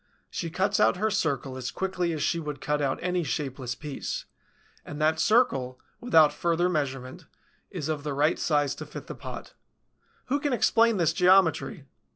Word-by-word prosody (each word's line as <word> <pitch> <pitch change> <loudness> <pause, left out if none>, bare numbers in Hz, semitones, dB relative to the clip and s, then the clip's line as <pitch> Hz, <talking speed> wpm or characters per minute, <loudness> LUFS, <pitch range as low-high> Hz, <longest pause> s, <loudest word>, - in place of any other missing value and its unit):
She 170 - -3
cuts 190 +4 0
out - - +4
her 215 +3 0
circle 140 -8 -1
as 130 -1 -4
quickly 185 -2 -2
as 155 -3 -2
she 170 - +1
would 150 -3 -5
cut 150 +2 -1
out 135 -2 0
any 180 -1 0
shapeless 130 -2 -3
piece; 145 0 -5 0.6
and 145 - -8
that 155 +1 +2
circle, 135 - +2 0.2
without 160 -11 +5
further 170 +3 +1
measurement, 135 -6 -3 0.4
is 155 -5 -5
of 155 -2 -2
the 145 -1 -4
right 150 +4 +2
size 145 -3 +1
to - - -7
fit - - -9
the - - -7
pot. - - -9 0.7
Who 280 +3 0
can 290 -2 -1
explain 230 -2 +3
this 165 -3 +2
geometry? 180 -2 +3
155 Hz, 175 wpm, -27 LUFS, 140-180 Hz, 0.7 s, without